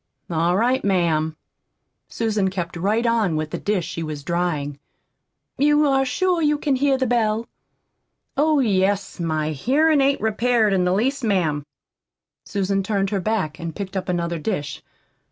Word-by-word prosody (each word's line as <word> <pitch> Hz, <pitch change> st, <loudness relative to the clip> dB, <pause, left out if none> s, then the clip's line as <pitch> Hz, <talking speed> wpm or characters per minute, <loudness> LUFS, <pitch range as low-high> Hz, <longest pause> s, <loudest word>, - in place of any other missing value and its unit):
"All 170 Hz, +2 st, +1 dB
right, 250 Hz, +5 st, +2 dB
ma'am." 160 Hz, -5 st, +1 dB, 0.7 s
Susan 215 Hz, -4 st, 0 dB
kept 180 Hz, -2 st, -4 dB
right 210 Hz, +7 st, 0 dB
on 225 Hz, -8 st, +2 dB
with 155 Hz, 0 st, -3 dB
the -, -, -3 dB
dish 205 Hz, -5 st, -1 dB
she 165 Hz, -, -5 dB
was 155 Hz, -3 st, -5 dB
drying. 155 Hz, -4 st, -2 dB, 0.8 s
"You 295 Hz, +1 st, +4 dB
are 270 Hz, -1 st, +3 dB
sure 360 Hz, +5 st, +1 dB
you 300 Hz, -1 st, +2 dB
can 290 Hz, -2 st, 0 dB
hear 275 Hz, 0 st, +2 dB
the 260 Hz, -, 0 dB
bell?" 225 Hz, -2 st, +1 dB, 0.9 s
"Oh, 305 Hz, +2 st, +3 dB
yes, 200 Hz, -5 st, +1 dB
my 155 Hz, -2 st, -1 dB
hearin' 285 Hz, -, +2 dB
ain't 275 Hz, +1 st, +2 dB
repaired 220 Hz, 0 st, +2 dB
in 185 Hz, -2 st, +2 dB
the 180 Hz, -, +2 dB
least, 260 Hz, +7 st, 0 dB
ma'am." 160 Hz, -9 st, 0 dB, 0.8 s
Susan 195 Hz, 0 st, -1 dB
turned 195 Hz, -1 st, -1 dB
her 200 Hz, -2 st, 0 dB
back 180 Hz, -7 st, -1 dB
and 165 Hz, -1 st, -5 dB
picked 195 Hz, -1 st, -6 dB
up 190 Hz, -1 st, -3 dB
another 170 Hz, -1 st, -1 dB
dish. 150 Hz, -5 st, -3 dB
200 Hz, 155 wpm, -22 LUFS, 170-245 Hz, 0.9 s, You